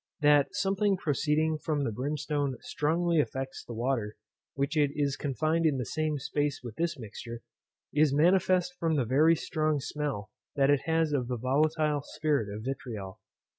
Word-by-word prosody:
That 145 -1 +4
something 195 0 +1
proceeding 155 -1 +1
from 150 -2 -1
the 115 - -1
brimstone 145 +2 -2
strongly 165 +2 +1
affects 135 -1 -5
the 120 - -8
water 115 -3 -1 0.4
which 140 +3 -1
is 145 -1 +1
confined 155 +4 0
in 145 -3 +1
the 125 - -2
same 155 +6 -1 0.2
place 145 -2 0
with 120 -3 -7
this 170 -1 -1
mixture, 115 0 -8 0.5
is 150 -1 +4
manifest 180 +4 +3
from 165 -1 +1
the 135 -4 +1
very 150 +7 +4
strong 155 -2 0
smell 135 -7 -4 0.2
that 140 0 +4
it 145 - +3
has 160 -1 +2
of 130 -4 0
the 125 -1 -2
volatile 150 +4 +1
spirit 145 -8 -1
of 105 +1 -6
vitriol. 115 -7 -5
145 Hz, 160 wpm, -29 LUFS, 130-155 Hz, 0.5 s, That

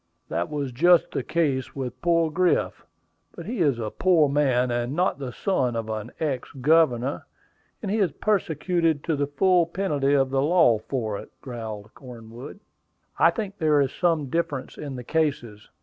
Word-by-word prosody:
"That 85 +2 -2
was 145 -3 -3
just 170 +7 +4
the - - -2
case 150 -5 -1
with 130 -3 -5
poor 165 -2 +2
Griff; 180 +2 0 0.5
but - - -9
he 240 -1 -4
is 145 -8 +2
a 110 -2 -4
poor 170 -5 +3
man, 130 -3 +1
and 120 +3 -2
not 180 -3 0
the 130 -3 -5
son 130 -8 -1
of 115 -1 -3
an 110 -1 -4
ex 140 -6 -2
governor; 140 -2 +2 0.6
and 200 - -2
he 220 - 0
is 195 -4 +2
persecuted 170 -5 0
to 165 - 0
the 145 0 -1
full 175 +3 +3
penalty 150 -6 0
of 135 -1 +2
the 135 0 +1
law 150 -7 +4
for 110 -3 -3
it," - - -11
growled 110 -4 -7
Cornwood. 125 - -11 0.6
"I - - +6
think 205 -3 -5
there 155 -3 +3
is 135 -2 +1
some 165 -4 +1
difference 150 -6 -2
in 140 -3 -6
the 125 - -7
cases. 120 -8 -2
145 Hz, 175 wpm, -25 LUFS, 125-170 Hz, 0.6 s, I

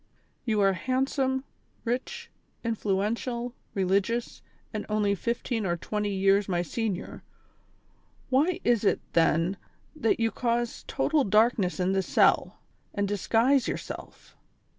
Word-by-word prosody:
"■ - - -39 0.4
You 215 -3 +1
are 195 -1 +4
handsome, 265 +4 0 0.4
rich, 470 - -3 0.3
influential, 230 +3 -1 0.2
religious 200 +5 0 0.3
and 215 - -3
only 210 -1 +2
fifteen 235 +2 -2
or 175 -3 0
twenty 210 +4 -2
years 195 +1 +2
my 175 -1 +1
senior; 205 0 -3 1.1
why 305 +7 +3
is 235 -3 +2
it 205 - +3
then 165 +3 +3 0.4
that 230 -8 +1
you 225 -1 +2
cause 235 -1 -1
total 290 +1 +1
darkness 210 -3 +2
in 180 +1 +2
this 195 0 0
cell, - - +3 0.3
and 200 -1 0
disguise 230 +5 +2
yourself - - -7
220 Hz, 120 wpm, -28 LUFS, 195-245 Hz, 1.1 s, are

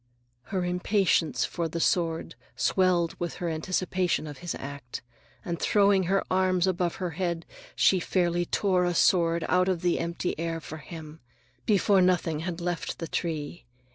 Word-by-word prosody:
Her 185 -3 -2
impatience 180 -1 +1
for 170 -2 -2
the 165 +1 -4
sword 165 -1 0 0.2
swelled 180 -3 +2
with 175 -1 -3
her 175 - -3
anticipation 180 +1 -1
of 145 -3 -8
his 175 -2 -4
act, 135 -4 -7 0.4
and 170 -3 -3
throwing 200 -2 +3
her 195 +2 +2
arms 185 -1 +2
above 180 -2 0
her 180 -2 -3
head, 170 0 -2 0.3
she 190 - +4
fairly 175 -1 0
tore 185 -3 +2
a 175 -1 0
sword 170 -2 +3
out 180 +1 +3
of 180 -2 -1
the 175 -1 +2
empty 170 +1 -2
air 165 0 -2
for 155 0 -8
him, 160 0 -10 0.5
before 200 -2 +4
Nothung 175 -4 +2
had 170 +1 -4
left 175 -1 -3
the 165 - -5
tree. 155 -5 -4
175 Hz, 160 wpm, -27 LUFS, 165-185 Hz, 0.5 s, she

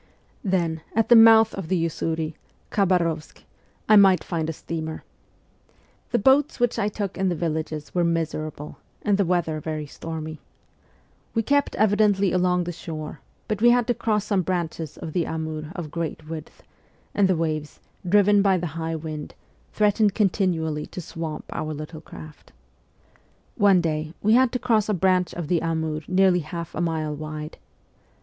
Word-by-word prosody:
Then, 170 -5 0
at 225 0 +2
the 240 - +8
mouth 225 -1 +7
of 195 -4 -5
the 185 +2 +1
Usuri 160 -1 -2 0.4
(Khabarovsk) 170 -5 0 0.4
I 215 - +6
might 195 -2 +6
find 160 -3 -2
a - - 0
steamer. 160 0 -5 1.1
The 240 - +1
boats 265 +6 +3
which 245 -1 +1
I 205 - +1
took 200 -2 -4
in 190 -1 +2
the 175 - -1
villages 155 -2 -3
were 175 - +2
miserable, 155 -3 -3 0.2
and 205 -1 +2
the 200 - +3
weather 170 -3 0
very 155 0 -4
stormy. 160 +1 -7 1.0
We 225 - +2
kept 285 +4 +1
evidently 205 -2 +3
along 180 -1 +2
the 175 - -4
shore, 155 -3 -7 0.3
but 210 -1 -2
we 240 - +7
had 245 0 +4
to 245 - +1
cross 220 -3 0
some 200 -3 +1
branches 165 -4 -3
of 155 - -7
the 170 -3 0
Amur 155 -1 -4
of 165 -5 -6
great 160 -2 -4
width, 160 -1 -8 0.5
and 200 -2 +3
the 185 -2 +1
waves, 155 -2 -3 0.2
driven 205 +2 +4
by 195 -2 +3
the 170 -3 -4
high 165 0 -2
wind, 155 -1 -6 0.4
threatened 210 -1 +2
continually 170 -7 0
to - - -8
swamp 165 -2 -6
our 155 0 -3
little 155 +1 -8
craft. 155 -1 -12 1.0
One 195 -3 +5
day 155 0 -2
we 215 +2 +4
had 255 0 +5
to - - +1
cross 225 -4 +1
a 210 - +2
branch 185 -1 +1
of 170 -3 -4
the 170 0 +1
Amur 160 -2 -1
nearly 185 -1 +4
half 170 +1 -6
a 165 - -3
mile 160 -3 -1
wide. 155 +1 -7
170 Hz, 165 wpm, -24 LUFS, 155-200 Hz, 1.1 s, the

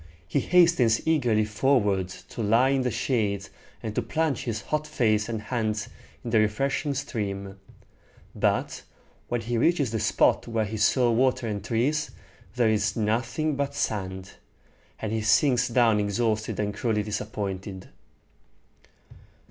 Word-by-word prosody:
He 85 - +1
hastens 170 -11 +3
eagerly 120 -9 +2
forward 105 -4 +1 0.2
to - - -6
lie 115 +5 +3
in 135 -1 +2
the 125 - 0
shade, 100 -5 -1 0.4
and 110 - -4
to 125 - 0
plunge 150 +4 -1
his 110 -3 -3
hot 155 0 -2
face 110 -7 +1
and 115 -2 -2
hands 110 -4 -2 0.3
in 120 - -5
the 110 - +4
refreshing 135 +7 0
stream; 100 -7 -4 0.7
but - - 0 0.5
when 120 -1 -1
he 115 +1 -2
reaches 145 -4 +2
the 110 - -1
spot - - +2
where 115 -2 0
he 110 +2 -5
saw 120 +3 +3
water 130 +1 +2
and 100 -2 -3
trees, 135 +8 0 0.5
there 120 -3 +3
is 105 -1 +1
nothing 120 +7 0
but 140 0 -2
sand, 95 -3 -3 0.7
and 110 - -3
he 110 0 -1
sinks 125 +3 +3
down 115 -3 +3
exhausted 110 +1 -1
and 105 -1 -1
cruelly 105 -1 0
disappointed. 100 -3 -5
115 Hz, 140 wpm, -26 LUFS, 105-130 Hz, 0.7 s, the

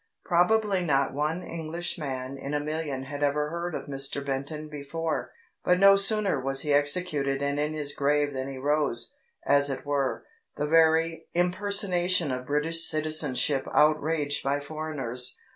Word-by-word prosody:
Probably 190 +2 +2
not 140 -4 +1
one 155 +5 -1
Englishman 155 -5 -4
in 140 +1 -4
a - - +1
million 150 -3 -3
had 145 +2 -6
ever 150 +1 +1
heard 170 0 -3
of - - -5
Mr 140 0 -4
Benton 140 +3 -4
before, 150 -2 -4 0.3
but 180 - +3
no 195 +1 +7
sooner 200 -4 +2
was 135 +1 -2
he 150 -2 0
executed 145 -2 +1
and 140 0 -1
in 150 +1 -1
his 145 -2 -3
grave 145 0 +1
than 130 0 -3
he 135 -1 -6
rose, 140 -4 +1 0.3
as 140 0 +3
it 135 0 -4
were, 140 -2 -1 0.3
the 150 - -1
very 160 +1 +3
impersonation 180 -2 +1
of 125 0 -4
British 160 +3 +2
citizenship 155 -3 0
outraged 150 -1 +2
by 140 +1 0
foreigners. 145 -5 -3
150 Hz, 150 wpm, -27 LUFS, 140-165 Hz, 0.3 s, no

